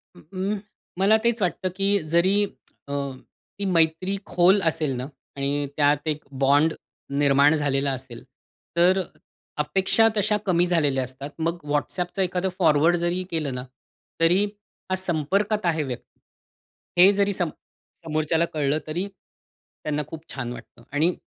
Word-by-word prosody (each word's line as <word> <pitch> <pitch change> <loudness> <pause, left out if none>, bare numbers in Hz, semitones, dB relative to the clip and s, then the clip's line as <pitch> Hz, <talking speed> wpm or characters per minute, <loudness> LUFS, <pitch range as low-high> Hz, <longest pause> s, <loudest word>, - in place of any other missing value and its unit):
अ, - - -15 0.2
अं, 200 +2 -1 0.4
मला 205 +3 +5
तेच 235 -1 +1
वाटतं 185 0 0
की 195 0 +2 0.3
जरी 185 +3 +4 0.5
अ, 140 - -5 0.7
ती 200 - 0
मैत्री 165 +4 +2 0.2
खोल 180 +3 +5
असेल 155 -3 -2
ना 125 +1 -4 0.3
आणि 140 0 -1 0.3
त्यात 145 +1 +2
एक 150 -1 -1 0.2
बॉन्ड 145 +4 +4 0.5
निर्माण 140 +2 +5
झालेला 140 -2 +1
असेल, 125 -3 -11 0.5
तर 180 +2 +5
अ - - 0 0.6
अपेक्षा 190 +8 +3
तशा 210 +1 +2
कमी 175 -2 +3
झालेल्या 145 -7 +1
असतात. 130 +3 -7
मग 165 +2 -1
व्हॉट्सॲपचं 175 +6 -2
एखादं 185 0 0
फॉरवर्ड 160 0 +4
जरी 175 +2 0
केलं 155 -5 -1
ना 125 - -4 0.6
तरी 175 +4 +5 0.5
हा 185 - +1
संपर्कात 190 +4 0
आहे 160 -3 +1
व्यक्ती. 130 -4 -8 0.8
हे 190 +2 +9
जरी 200 0 +3
समो 175 -4 -1 0.5
समोरच्याला 160 +1 +1
कळलं 150 -1 +1
तरी 175 +6 -2
त्यांना 150 -5 -8
खूप 160 0 -9
छान 120 -3 -4
वाटतं 120 - -13
आणि 155 +5 +2
165 Hz, 140 wpm, -24 LUFS, 145-185 Hz, 0.8 s, हे